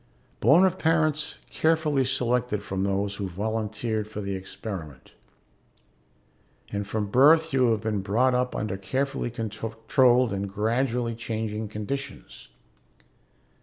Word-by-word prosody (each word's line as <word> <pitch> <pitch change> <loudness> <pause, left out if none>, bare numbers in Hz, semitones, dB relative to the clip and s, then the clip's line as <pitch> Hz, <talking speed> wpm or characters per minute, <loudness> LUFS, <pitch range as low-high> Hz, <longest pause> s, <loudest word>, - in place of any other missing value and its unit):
Born 150 - +6
of 185 0 0
parents 155 -2 +1
carefully 155 -4 +2
selected 125 -4 0
from 95 -1 -2
those 100 0 -1
who 100 -2 -3
volunteered 110 +2 -2
for 105 - -7
the 100 -1 -3
experiment. 95 - -7 1.6
And 100 -1 -3
from 105 0 -1
birth 160 +5 +5
you 130 -3 +4
have 110 -2 +1
been 110 -2 -1
brought 115 +7 +2
up 125 0 0
under 105 -2 -2
carefully 130 +7 -2
controlled 115 +2 +1
and 100 0 -3
gradually 115 +3 0
changing 110 -1 -3
conditions. 130 +7 -6
115 Hz, 120 wpm, -26 LUFS, 105-130 Hz, 1.6 s, Born